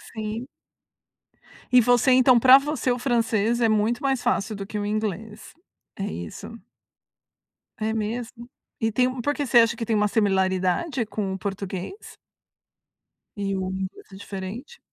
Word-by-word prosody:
Sim. 220 +3 -4 1.2
E 250 0 +6
você 245 +2 +3
então, 255 -1 +6
pra 255 +2 +9
você, 285 -2 -1
o 245 - 0
francês 235 -2 +1
é 230 - +3
muito 215 +3 +1
mais 270 -3 0
fácil 220 -3 0
do 195 0 -6
que 210 +1 -5
o 205 - -3
inglês. 215 0 -4 0.5
É 195 - -2
isso? 85 - -7 1.3
É 220 +1 -1
mesmo? 235 +2 -4 0.3
E 225 -1 0
tem 250 +2 0
por 290 +4 0
que, 290 - -2
você 240 -2 +5
acha 230 0 +3
que 230 - -4
tem 225 - 0
uma 210 0 +3
similaridade 195 - +1
com 200 -2 -3
o - - -4
português? 195 - -6 1.2
E 195 -1 -2
o 185 -1 -2
inglês 190 0 -6
é - - -11
diferente? 200 - -8
220 Hz, 155 wpm, -24 LUFS, 200-245 Hz, 1.3 s, pra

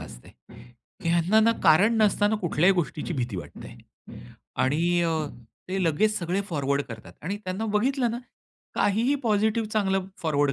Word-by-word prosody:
असते, - - -11 0.7
की - - -1
ह्यांना 175 +6 +3
ना, 230 +1 +4
कारण 205 +9 +5
नसताना 205 +1 +2
कुठल्याही 180 0 +2
गोष्टीची 170 -1 -2
भीती 120 -7 -3
वाटते 85 - -9 0.9
आणि 170 +6 +2
अ, 165 -1 +1 0.6
ते 190 +1 -1
लगेच 210 +7 +2
सगळे 180 +3 -1
फॉरवर्ड 140 -3 0
करतात 110 -2 -10
आणि 195 +6 -3
त्यांना 185 +4 -3
बघितलं 250 +3 +1
ना 235 - -4 0.6
काहीही 230 +7 +2
पॉझिटिव्ह 220 0 +1
चांगलं 195 -3 0
फॉरवर्ड 145 -4 +1
185 Hz, 145 wpm, -26 LUFS, 155-215 Hz, 0.9 s, कारण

